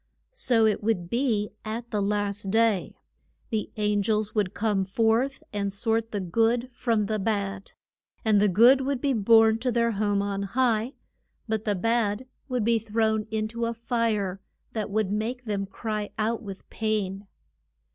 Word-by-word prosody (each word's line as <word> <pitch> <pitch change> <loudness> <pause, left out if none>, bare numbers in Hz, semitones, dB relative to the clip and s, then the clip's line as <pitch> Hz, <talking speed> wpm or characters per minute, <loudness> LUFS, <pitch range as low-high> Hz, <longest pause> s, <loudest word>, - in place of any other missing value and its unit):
So 245 - +2
it 215 -2 +1
would 205 -5 -1
be 235 -5 0
at 230 +2 -5
the 210 -2 0
last 205 -1 -1
day. 220 -2 +2 0.6
The 220 -2 -1
an 210 -1 +1
gels 215 +1 0
would 205 -3 0
come 205 -3 +1
forth 225 +7 +1
and 200 -1 -1
sort 225 +2 0
the 205 - -3
good 230 +7 +1
from 230 -4 0
the 215 +1 -1
bad. 200 -2 -2 0.5
And 210 -2 +4
the 210 - +5
good 235 +8 +6
would 270 0 -1
be 275 +1 +1
borne 225 0 +5
to 250 +1 0
their 235 0 +2
home 205 -1 0
on 200 -1 -2
high, 230 +3 0 0.5
but 220 -1 -2
the 205 -2 +1
bad 225 +2 0 0.2
would 250 -3 0
be 230 0 +3
thrown 220 0 0
in 215 -1 -1
to 230 +1 -2
a 230 - -3
fire 220 -5 -1 0.3
that 215 -2 -3
would 210 -1 0
make 235 +4 -2
them 200 -2 -2
cry 210 +1 -4
out 220 +2 0
with 195 -3 -9
pain. 205 -3 -2
220 Hz, 165 wpm, -26 LUFS, 205-230 Hz, 0.6 s, good